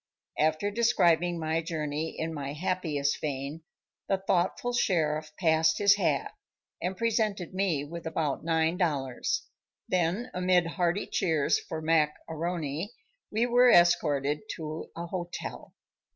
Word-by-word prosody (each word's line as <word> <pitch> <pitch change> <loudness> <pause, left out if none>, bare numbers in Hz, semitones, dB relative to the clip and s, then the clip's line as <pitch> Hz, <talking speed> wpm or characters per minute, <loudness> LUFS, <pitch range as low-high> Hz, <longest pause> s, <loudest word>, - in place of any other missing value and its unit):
After 155 +6 +2
describing 175 -7 +3
my 160 +1 0
journey 155 -1 -3
in 160 0 -2
my 140 -2 -4
happiest 150 -4 -1
vein, 140 +2 -4 0.5
the 195 - +3
thoughtful 190 +5 0
sheriff 155 -9 +1
passed 160 -2 +3
his 200 -1 +6
hat - - 0 0.5
and 185 +1 -2
presented 215 -5 0
me 185 -7 0
with 165 +2 -7
about 160 -3 -1
nine 165 +1 +1
dollars. 140 -8 -1 0.4
Then 185 +6 0
amid 180 -1 +3
hearty 175 +3 0
cheers 160 -6 +1
for 160 0 -6
Mac 155 -2 +3
A'Rony, 160 0 -3 0.4
we 220 +3 +1
were 245 +1 +5
escorted 150 - +4 0.2
to 155 -1 -6
a 170 - -4
hotel. 175 0 -6
165 Hz, 125 wpm, -29 LUFS, 155-185 Hz, 0.5 s, his